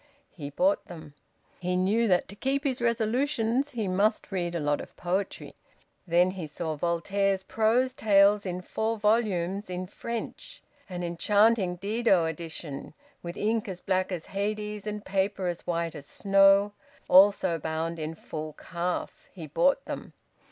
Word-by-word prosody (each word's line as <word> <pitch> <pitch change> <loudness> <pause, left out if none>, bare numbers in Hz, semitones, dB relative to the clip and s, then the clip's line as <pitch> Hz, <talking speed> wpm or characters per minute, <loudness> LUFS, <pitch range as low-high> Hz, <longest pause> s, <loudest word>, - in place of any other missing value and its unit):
He 145 -4 -7
bought 185 +7 +1
them. 160 -4 -10 0.5
He 180 0 -1
knew 205 +6 +2
that 180 -3 +2
to 200 - -10
keep 275 +5 -1
his 260 -4 -1
resolutions 235 +3 +1
he 220 -4 -2
must 205 +4 +1
read 175 -2 -2
a - - 0
lot 145 -1 0
of - - -12
poetry. 185 +2 -3 0.5
Then 175 +2 +4
he 185 -4 -6
saw 155 +1 -4
Voltaire's 190 +4 0
prose 230 +5 +2
tales 205 -3 +4
in 180 -1 -4
four 220 +4 -2
volumes, 205 -3 +1
in 180 0 -3
French, 235 - -7 0.3
an 180 -1 -4
enchanting 200 +2 +3
Didot 200 -3 +2
edition, 160 -3 -7 0.3
with 170 0 -7
ink 220 +1 0
as 180 -2 -5
black 185 0 0
as 175 -3 -4
Hades 210 +1 -3
and 210 0 -4
paper 195 0 0
as 175 -1 -3
white 170 -2 -1
as 145 -1 -9
snow; 195 +1 +4 0.3
also 190 -3 +5
bound 160 +2 -3
in 155 +1 -4
full 155 -1 -6
calf. 175 +2 -4
He - - -8
bought - - +2
them. - - -6
195 Hz, 150 wpm, -28 LUFS, 175-215 Hz, 0.5 s, also